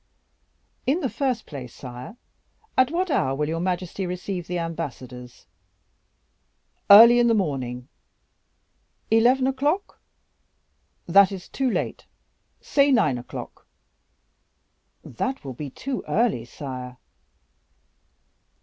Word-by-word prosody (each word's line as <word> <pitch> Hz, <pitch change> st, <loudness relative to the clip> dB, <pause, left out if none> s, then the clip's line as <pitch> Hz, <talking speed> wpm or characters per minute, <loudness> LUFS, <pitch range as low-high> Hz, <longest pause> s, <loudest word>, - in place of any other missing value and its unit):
"In 300 Hz, +7 st, +2 dB
the 265 Hz, -, -1 dB
first 255 Hz, -6 st, -1 dB
place, 130 Hz, -5 st, -9 dB
sire, 125 Hz, -, -9 dB, 0.6 s
at 260 Hz, 0 st, +4 dB
what 350 Hz, +2 st, -1 dB
hour 135 Hz, -, +1 dB
will 150 Hz, +1 st, -1 dB
your 165 Hz, +1 st, -2 dB
majesty 180 Hz, +1 st, -2 dB
receive 180 Hz, 0 st, -5 dB
the 180 Hz, -, -2 dB
ambassadors?" 130 Hz, -7 st, -6 dB, 1.4 s
"Early 230 Hz, +4 st, +10 dB
in 240 Hz, -, +4 dB
the 230 Hz, -, +3 dB
morning." 130 Hz, -, -2 dB, 1.2 s
"Eleven 245 Hz, +4 st, +4 dB
o'clock?" 290 Hz, +9 st, -1 dB, 1.1 s
"That 195 Hz, +3 st, +5 dB
is 190 Hz, -2 st, -7 dB
too 265 Hz, -1 st, -1 dB
late -, -, -3 dB, 0.5 s
say 280 Hz, -1 st, +2 dB
nine 170 Hz, -, +3 dB
o'clock." 120 Hz, -, -9 dB, 1.4 s
"That 260 Hz, -, -4 dB
will 135 Hz, -, -5 dB
be 145 Hz, +3 st, -6 dB
too 260 Hz, -, -5 dB
early, 220 Hz, -, +1 dB
sire." 125 Hz, -1 st, -8 dB
180 Hz, 105 wpm, -24 LUFS, -, 1.4 s, Early